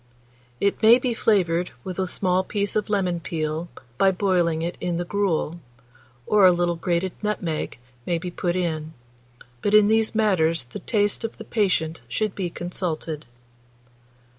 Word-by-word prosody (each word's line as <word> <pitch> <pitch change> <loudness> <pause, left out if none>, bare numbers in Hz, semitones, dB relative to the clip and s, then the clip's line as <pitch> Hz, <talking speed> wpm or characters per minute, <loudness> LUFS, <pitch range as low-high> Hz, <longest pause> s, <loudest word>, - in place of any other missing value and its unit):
It 200 0 +1
may 225 +2 +8
be 250 -1 -1
flavoured 180 -6 +2
with 185 0 -5
a 190 - 0
small 185 0 +1
piece 200 +1 -2
of 210 -1 0
lemon 185 -4 0
peel, 160 0 -3 0.3
by 195 - +6
boiling 180 -4 +1
it 170 +1 -3
in 175 -1 -1
the 175 - -2
gruel, 175 -4 -1 0.7
or 210 -1 +4
a 185 - +9
little 175 0 +1
grated 170 +2 -1
nutmeg 180 -10 -2 0.3
may 175 - +1
be 175 +2 -5
put 175 0 -1
in; 160 -3 -2 0.7
but 205 - +2
in 210 -1 +6
these 220 0 +2
matters 170 - +2
the 120 0 -9
taste 205 -1 +1
of 225 - -4
the 225 - -9
patient 170 - 0
should 210 - -1
be 185 -3 -3
consulted. 165 -4 -4
180 Hz, 160 wpm, -24 LUFS, 170-205 Hz, 0.7 s, a